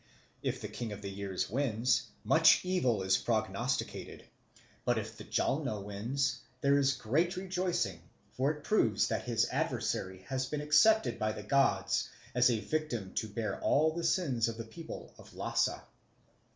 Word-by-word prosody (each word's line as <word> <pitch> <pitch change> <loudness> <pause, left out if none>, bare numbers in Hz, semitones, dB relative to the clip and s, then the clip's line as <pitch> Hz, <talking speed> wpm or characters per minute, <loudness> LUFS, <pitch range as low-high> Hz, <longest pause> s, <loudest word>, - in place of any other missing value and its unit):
If - - -2
the - - -4
King 120 -3 -5
of 105 0 -7
the 100 - -4
Years 95 -1 -3
wins, 125 0 +1 0.2
much - - +5
evil 130 - +1
is 95 0 +3
prognosticated; 115 +2 -2 0.6
but 120 -1 +1
if 110 0 -4
the 105 - -9
Jalno 130 -5 0
wins, 125 +7 -1 0.2
there 140 +1 +4
is 135 -1 +3
great 140 +10 0
rejoicing, 180 - -1 0.3
for 130 +5 +1
it 150 -1 -4
proves 215 - +2
that - - -2
his 115 -2 +2
adversary 95 0 -2
has 130 -1 -1
been 150 +2 -3
accepted 150 +10 +4
by 110 0 0
the 105 - -7
gods 105 -6 +2 0.2
as 125 0 +5
a 115 -3 +1
victim 120 -12 -3
to 110 - -1
bear 110 +1 -3
all 155 +2 +3
the 170 +1 -4
sins 140 -10 +1
of 115 -1 -4
the 115 - -4
people 160 +9 -9
of - - -15
Lhasa. - - 0
125 Hz, 165 wpm, -32 LUFS, 110-150 Hz, 0.6 s, much